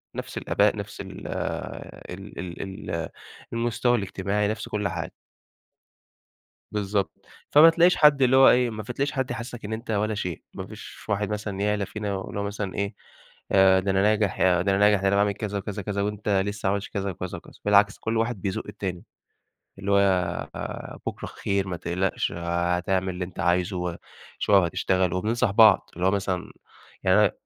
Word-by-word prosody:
نَفْس -, -, -6 dB
الآباء، -, -, +2 dB
نَفْس -, -, -6 dB
ال -, -, -9 dB
ال 95 Hz, 0 st, -6 dB, 0.2 s
ال 95 Hz, +1 st, -7 dB
ال 85 Hz, 0 st, -2 dB, 0.4 s
المستوى 120 Hz, +1 st, +1 dB
الاجتماعي، 100 Hz, +1 st, -1 dB
نَفْس 110 Hz, 0 st, -3 dB
كُلّ 105 Hz, -1 st, -1 dB
حاجة 85 Hz, -3 st, -4 dB, 1.6 s
بالضبط، 100 Hz, -1 st, -2 dB, 0.2 s
فما 155 Hz, +3 st, +8 dB
تلاقيش 175 Hz, +2 st, +4 dB
حد 150 Hz, -3 st, +5 dB
اللي 130 Hz, +1 st, +5 dB
هو 135 Hz, -, +8 dB
إيه، 125 Hz, -1 st, +3 dB
ما 110 Hz, -1 st, -5 dB
ف 115 Hz, -, -11 dB
تلاقيش 140 Hz, +2 st, -1 dB
حد 130 Hz, -2 st, -2 dB
يحسسك 120 Hz, 0 st, -6 dB
إن 105 Hz, -, -5 dB
أنت 115 Hz, +1 st, -5 dB
ولا 110 Hz, +1 st, 0 dB
شيء، 90 Hz, -5 st, -4 dB
ما -, -, -6 dB
فيش -, -, -11 dB
واحد 105 Hz, 0 st, 0 dB
مثلًا 105 Hz, -2 st, -3 dB
يعلى 105 Hz, -1 st, 0 dB
فينا 100 Hz, -3 st, -3 dB
اللي 100 Hz, -, -5 dB
هو -, -, -1 dB
مثلًا 100 Hz, -1 st, -4 dB
إيه 100 Hz, +1 st, -2 dB, 0.6 s
آآ، 95 Hz, -1 st, +6 dB
ده 95 Hz, +1 st, -1 dB
أنا 95 Hz, 0 st, +2 dB
ناجح 105 Hz, -1 st, +2 dB
ي -, -, +3 dB
ده 90 Hz, -1 st, +4 dB
أنا 95 Hz, +1 st, +2 dB
ناجح 105 Hz, -1 st, +5 dB
ده 100 Hz, -, +3 dB
أنا 100 Hz, -, +2 dB
باعمل 100 Hz, 0 st, +3 dB
كذا 105 Hz, -1 st, -3 dB
وكذا 105 Hz, +1 st, -5 dB
وكذا 100 Hz, 0 st, -2 dB
وأنت 105 Hz, 0 st, -3 dB, 0.2 s
لسه 105 Hz, -1 st, -3 dB
ما -, -, +3 dB
عملتش 100 Hz, 0 st, -3 dB
كذا 100 Hz, -1 st, -2 dB
وكذا 90 Hz, 0 st, -5 dB
وكذا، -, -, -15 dB
بالعكس 100 Hz, 0 st, +4 dB
كُلّ 110 Hz, 0 st, -2 dB
واحد 115 Hz, -3 st, -1 dB
بيزق 95 Hz, -2 st, -2 dB
التاني 90 Hz, -3 st, -5 dB, 0.8 s
اللي 100 Hz, +1 st, -2 dB
هو 95 Hz, -3 st, 0 dB
بُكرة -, -, -4 dB
خير 100 Hz, -1 st, -2 dB
ما 90 Hz, -2 st, -3 dB
تقلقش، 90 Hz, +4 st, -1 dB
آآ، 85 Hz, +1 st, 0 dB
هتعمل 95 Hz, +1 st, 0 dB
اللي 90 Hz, 0 st, -3 dB
أنت 90 Hz, -1 st, -12 dB
عايزه 90 Hz, +1 st, +1 dB
وشوية 90 Hz, +3 st, -1 dB
وهتشتغل، 90 Hz, +1 st, +1 dB
وبننصح 110 Hz, +4 st, +1 dB
بعض، 110 Hz, -1 st, +6 dB
اللي 90 Hz, +2 st, -1 dB
هو -, -, +4 dB
مثلًا 95 Hz, -3 st, -2 dB, 0.5 s
يعني -, -, +5 dB
أنا -, -, +5 dB
100 Hz, 185 wpm, -25 LUFS, 95-105 Hz, 1.6 s, فما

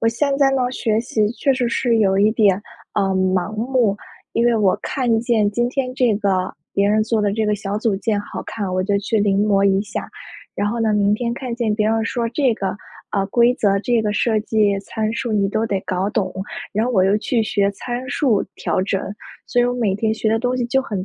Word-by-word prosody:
我 225 Hz, -, +3 dB
现 275 Hz, +5 st, 0 dB
在 275 Hz, -1 st, +4 dB
呢， 255 Hz, -2 st, +1 dB
学 220 Hz, -4 st, 0 dB
习 220 Hz, -2 st, 0 dB
确 275 Hz, +2 st, +1 dB
实 245 Hz, -2 st, 0 dB
是 235 Hz, -1 st, +1 dB
有 195 Hz, -2 st, +3 dB
一 210 Hz, +2 st, +4 dB
点， 205 Hz, -3 st, +3 dB, 0.3 s
呃， -, -, +2 dB
盲 185 Hz, +1 st, 0 dB
目， 235 Hz, -2 st, +1 dB, 0.4 s
因 235 Hz, -, +1 dB
为 240 Hz, -, +3 dB
我 200 Hz, -3 st, +3 dB
看 240 Hz, -4 st, 0 dB
见 230 Hz, -3 st, +2 dB
今 240 Hz, +3 st, 0 dB
天 255 Hz, -1 st, -2 dB
这 245 Hz, -4 st, +2 dB
个 195 Hz, -3 st, 0 dB, 0.2 s
别 200 Hz, 0 st, +2 dB
人 215 Hz, +1 st, +3 dB
做 225 Hz, -1 st, 0 dB
的 205 Hz, -, +1 dB
这 220 Hz, +1 st, 0 dB
个 210 Hz, -, +2 dB
小 200 Hz, +1 st, -3 dB
组 215 Hz, -2 st, 0 dB
件 210 Hz, +1 st, -1 dB
好 -, -, -7 dB
看， 200 Hz, -4 st, -4 dB
我 185 Hz, -, +1 dB
就 200 Hz, +1 st, +1 dB
去 215 Hz, +2 st, -1 dB
临 200 Hz, 0 st, +2 dB
摹 200 Hz, -2 st, +3 dB
一 195 Hz, 0 st, +3 dB
下。 210 Hz, -, -6 dB, 0.5 s
然 205 Hz, 0 st, 0 dB
后 230 Hz, +1 st, -2 dB
呢， 220 Hz, -1 st, +2 dB
明 205 Hz, 0 st, +3 dB
天 235 Hz, +2 st, -2 dB
看 250 Hz, -2 st, -5 dB
见 235 Hz, -3 st, 0 dB
别 215 Hz, 0 st, +1 dB
人 225 Hz, 0 st, +1 dB
说 235 Hz, 0 st, -1 dB
这 255 Hz, +1 st, +1 dB
个， 195 Hz, -2 st, -3 dB, 0.3 s
呃， 195 Hz, -1 st, 0 dB
规 240 Hz, +4 st, +3 dB
则、 200 Hz, -5 st, +2 dB
这 235 Hz, 0 st, +1 dB
个 210 Hz, -1 st, 0 dB
设 220 Hz, +1 st, +1 dB
计 210 Hz, -2 st, +1 dB
参 215 Hz, +2 st, -3 dB
数 230 Hz, -1 st, -2 dB
你 200 Hz, -2 st, +2 dB
都 220 Hz, +2 st, 0 dB
得 195 Hz, -3 st, -1 dB
搞 185 Hz, +2 st, -1 dB
懂， 195 Hz, -4 st, -1 dB, 0.4 s
然 215 Hz, -, +1 dB
后 250 Hz, -, -1 dB
我 190 Hz, -, +3 dB
又 200 Hz, +2 st, +3 dB
去 230 Hz, +1 st, 0 dB
学 200 Hz, -2 st, +1 dB
参 245 Hz, +5 st, -5 dB
数 255 Hz, -8 st, +1 dB
调 -, -, -1 dB
整。 195 Hz, 0 st, -1 dB, 0.5 s
所 245 Hz, -, +1 dB
以 -, -, +4 dB
我 245 Hz, 0 st, 0 dB
每 220 Hz, -6 st, 0 dB
天 220 Hz, +2 st, 0 dB
学 220 Hz, 0 st, -1 dB
的 225 Hz, -, +2 dB
东 250 Hz, +2 st, -1 dB
西 245 Hz, -, -1 dB
就 265 Hz, +2 st, +2 dB
很 195 Hz, -6 st, -4 dB
215 Hz, 255 characters per minute, -20 LUFS, 200-240 Hz, 0.5 s, 在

